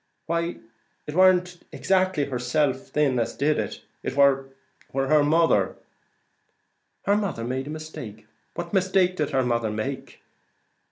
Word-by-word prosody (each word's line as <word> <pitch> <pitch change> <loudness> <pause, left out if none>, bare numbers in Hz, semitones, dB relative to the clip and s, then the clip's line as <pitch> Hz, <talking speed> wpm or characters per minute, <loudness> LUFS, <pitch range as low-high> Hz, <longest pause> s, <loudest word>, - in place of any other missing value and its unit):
"Why 170 +1 -1 0.5
it 150 - -6
warn't 180 0 +4
exactly 185 -5 +1
herself 130 +1 -1
thin 140 -4 +1
as 115 - -2
did 150 +2 +1
it; - - -4 0.2
it - - -4
war 135 -1 +4 0.4
her 135 +3 +3
mother." 165 +3 +3 1.3
"Her 200 - +3
mother 200 - -2
made 130 +3 -3
a - - -6
mistake! 155 -9 -8 0.3
What - - -5
mistake 185 -1 +2
did 150 -2 0
her 135 -3 +1
mother 115 -2 0
make?" 110 +6 -5
150 Hz, 130 wpm, -25 LUFS, 130-175 Hz, 1.3 s, warn't